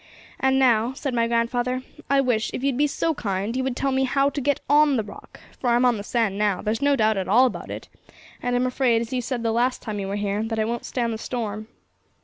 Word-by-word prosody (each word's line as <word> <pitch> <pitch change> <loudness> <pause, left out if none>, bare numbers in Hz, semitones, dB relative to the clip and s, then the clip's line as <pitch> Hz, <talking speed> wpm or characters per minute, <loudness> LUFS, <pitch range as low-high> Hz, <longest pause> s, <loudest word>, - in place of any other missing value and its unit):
'And 265 0 +2
now,' 245 -2 +3
said 270 -1 -4
my 230 -1 +2
grandfather, 245 +2 0 0.3
'I 275 0 +4
wish, 240 -4 0
if 255 - -5
you'd 275 -2 +1
be 295 +3 +2
so 325 +3 0
kind, 205 -3 -3
you 260 - 0
would 260 -1 -2
tell 275 +1 0
me 265 0 +2
how 275 +2 +2
to 280 - -3
get 285 +1 +1
on 290 -1 +4
the 220 - 0
Rock, 205 - -12 0.2
for 245 - 0
I'm 240 +1 +3
on 245 -2 +3
the 200 - -6
sand 210 -3 0
now; 205 -3 +1
there's 220 +4 -2
no 285 0 +3
doubt 220 -4 +2
at 190 - -2
all 235 +7 +5
about 255 - -3
it, - - -7 0.5
and 245 0 -1
I'm 245 +1 +2
afraid, 250 -2 +2
as 235 +2 -5
you 250 - 0
said 240 -1 -3
the 225 - +1
last 245 +3 0
time 215 -3 -4
you 195 - -3
were 195 - -3
here, 205 0 -1
that 225 0 -3
it 215 0 +1
won't 235 0 -3
stand 235 -2 -1
the 220 - -5
storm.' 215 -3 -4
240 Hz, 260 wpm, -24 LUFS, 220-265 Hz, 0.5 s, all